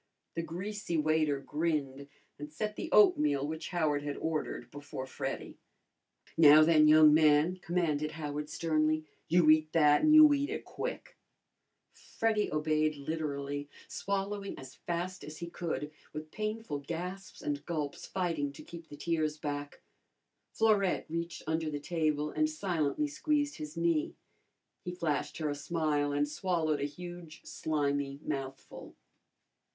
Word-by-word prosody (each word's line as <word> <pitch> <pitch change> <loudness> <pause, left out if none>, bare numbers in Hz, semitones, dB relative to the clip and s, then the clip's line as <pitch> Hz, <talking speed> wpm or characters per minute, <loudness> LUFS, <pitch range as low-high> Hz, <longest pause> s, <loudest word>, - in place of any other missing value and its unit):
The 165 - -2
greasy 180 +2 -4
waiter 155 -2 +2
grinned 140 -2 -2 0.3
and 150 +1 -7
set 210 +7 -3
the - - -5
oatmeal 150 -9 +5
which 160 +2 -5
Howard 155 -5 +1
had 145 -1 -4
ordered 160 -1 -3
before 145 -2 -7
Freddy. - - -5 0.8
"Now, 155 -1 +8
then, 155 -1 +5
young 155 0 +8
man," 155 +3 +4
commanded 170 -4 -1
Howard 150 -1 -4
sternly, 155 -1 +1 0.2
"you 170 -1 +4
eat 155 0 +3
that, 150 -2 +5
and 310 - +4
you 305 -1 +9
eat 285 0 0
it - - -4
quick!" - - -6 0.7
Freddy 220 -2 -1
obeyed 155 0 +1
literally, 145 -1 -4 0.2
swallowing 200 0 -3
as 130 -1 -10
fast 180 +2 -4
as 155 +1 -8
he 170 +1 -7
could, 160 -4 -3 0.2
with 155 +1 -7
painful 215 -8 -3
gasps 180 +6 -6
and 145 -1 -2
gulps, 150 -5 -3
fighting 165 -7 -1
to - - -11
keep 170 -1 -10
the 145 - -10
tears 155 -1 -1
back. 145 -1 -5 0.7
Florette 210 -4 +2
reached 170 +1 -4
under 160 0 -1
the 145 -1 -3
table 150 -1 -1
and 310 0 +1
silently 185 - -1
squeezed 295 0 -1
his 150 +2 -7
knee. 165 -2 +1 0.7
He 180 0 -5
flashed 160 -5 -2
her 155 -2 -1
a - - -1
smile 145 -1 0
and 145 +1 +1
swallowed 155 -1 -1
a - - +1
huge 175 +1 -9
slimy 145 -2 -1
mouthful. 135 -2 -6
155 Hz, 140 wpm, -31 LUFS, 145-175 Hz, 0.8 s, you